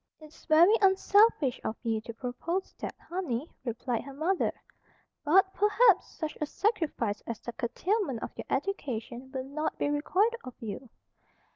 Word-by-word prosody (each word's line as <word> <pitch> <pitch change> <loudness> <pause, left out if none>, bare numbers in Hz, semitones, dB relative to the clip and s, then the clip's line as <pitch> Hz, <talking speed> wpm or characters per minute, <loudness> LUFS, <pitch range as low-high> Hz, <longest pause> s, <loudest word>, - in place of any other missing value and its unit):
"It's 310 -1 -16
very 340 +5 +7
unselfish 385 - +4
of 220 - -2
you 225 -2 0
to 230 - -8
propose 270 +10 -3
that, - - -5
honey," 320 -7 -2 0.2
replied 240 -1 -2
her 275 0 -10
mother. 350 +6 +1 0.7
"But, 380 +5 +4
perhaps, 420 -1 +4
such 315 -2 -4
a 300 - 0
sacrifice 300 - -1
as 230 -2 -4
the 240 - -7
curtailment 270 - -1
of - - -5
your - - -7
education 255 - -3
will 260 -2 -3
not 305 +4 -3
be - - 0
required 390 +10 +1
of 255 - -9
you." 230 +3 -6
300 Hz, 150 wpm, -29 LUFS, 245-380 Hz, 0.7 s, very